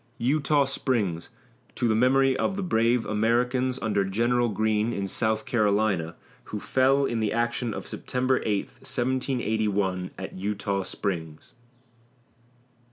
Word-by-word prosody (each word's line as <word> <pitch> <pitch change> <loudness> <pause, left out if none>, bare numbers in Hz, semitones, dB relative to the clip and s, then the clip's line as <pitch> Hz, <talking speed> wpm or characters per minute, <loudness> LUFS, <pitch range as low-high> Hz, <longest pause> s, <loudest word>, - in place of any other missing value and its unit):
EUTAW 140 +3 +2
SPRINGS 110 -11 -1 0.5
TO 120 - 0
THE 110 - +3
MEMORY 130 +3 +3
OF 190 - 0
THE 200 - -3
BRAVE 115 -7 +2
AMERICANS, 125 +4 +1
UNDER 105 -2 +1
GENERAL 120 +5 +1
GREENE, 110 +2 0
IN 100 -2 -2
SOUTH 110 +2 -1
CAROLINA, 100 -7 +1 0.3
WHO 105 - -5
FELL 135 +5 +2
IN 120 -3 -1
THE 110 -2 0
ACTION 120 +1 -1
OF - - -6
SEPTEMBER 130 +1 -1
8, 105 -2 0
1781, 110 -7 -1
AT 95 - -6
EUTAW 100 0 -1
SPRINGS. 80 -6 -4
110 Hz, 125 wpm, -26 LUFS, 100-125 Hz, 0.5 s, THE